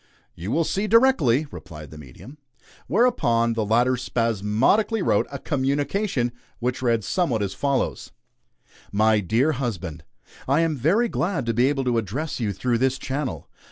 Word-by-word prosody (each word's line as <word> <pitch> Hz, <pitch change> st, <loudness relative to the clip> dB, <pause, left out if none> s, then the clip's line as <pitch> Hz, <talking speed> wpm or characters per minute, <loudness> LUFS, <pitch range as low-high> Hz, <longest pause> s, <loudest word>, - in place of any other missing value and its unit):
"You 90 Hz, +5 st, -7 dB
will 165 Hz, +8 st, +2 dB
see, 195 Hz, +6 st, -1 dB
directly," 205 Hz, -, +4 dB
replied 75 Hz, -5 st, -10 dB
the 80 Hz, -, -10 dB
medium. 75 Hz, -, -13 dB, 0.5 s
Whereupon 120 Hz, -, +2 dB
the 115 Hz, -1 st, -1 dB
latter 120 Hz, +4 st, +2 dB
spasmodically 115 Hz, -, +1 dB
wrote -, -, +2 dB
a -, -, -4 dB
"communication," 140 Hz, -, -1 dB, 0.3 s
which 125 Hz, +1 st, -2 dB
read 115 Hz, -4 st, +1 dB
somewhat 120 Hz, -, 0 dB
as 95 Hz, -1 st, -3 dB
follows: 140 Hz, -2 st, -1 dB, 0.8 s
"MY 110 Hz, +1 st, +3 dB
DEAR 115 Hz, -, +1 dB
HUSBAND: 95 Hz, -, -4 dB, 0.4 s
I 140 Hz, +5 st, +3 dB
am 165 Hz, -2 st, +1 dB
very 175 Hz, -, +2 dB
glad 175 Hz, -, -2 dB
to 115 Hz, -, 0 dB
be 120 Hz, +3 st, +3 dB
able 140 Hz, -1 st, 0 dB
to 120 Hz, -2 st, +1 dB
address 130 Hz, -, -4 dB
you 110 Hz, -4 st, -1 dB
through 115 Hz, +4 st, -1 dB
this 130 Hz, +1 st, +1 dB
channel. 135 Hz, 0 st, -4 dB
125 Hz, 155 wpm, -24 LUFS, 110-150 Hz, 0.8 s, directly